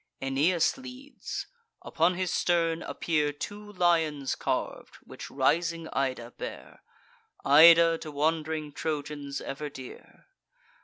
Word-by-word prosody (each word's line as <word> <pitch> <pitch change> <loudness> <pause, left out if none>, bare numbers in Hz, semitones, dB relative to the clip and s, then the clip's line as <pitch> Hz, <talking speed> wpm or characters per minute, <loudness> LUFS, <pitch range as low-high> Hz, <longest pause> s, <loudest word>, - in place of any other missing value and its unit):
Aeneas 150 - +1
leads; 260 +2 -7 0.4
upon 170 +2 +1
his 185 -1 -2
stern 165 -1 +1
appear 150 -3 -1
Two 205 +8 -8
lions 165 -7 +1
carv'd, - - -3
which - - -10
rising 165 +4 0
Ida 130 -3 -2
bear— - - -8 0.6
Ida, 165 +3 +7
to 155 - -8
wand'ring 155 0 -1
Trojans 145 -2 -4
ever 145 +2 -5
dear. 130 -3 -12
160 Hz, 105 wpm, -28 LUFS, 145-170 Hz, 0.6 s, Ida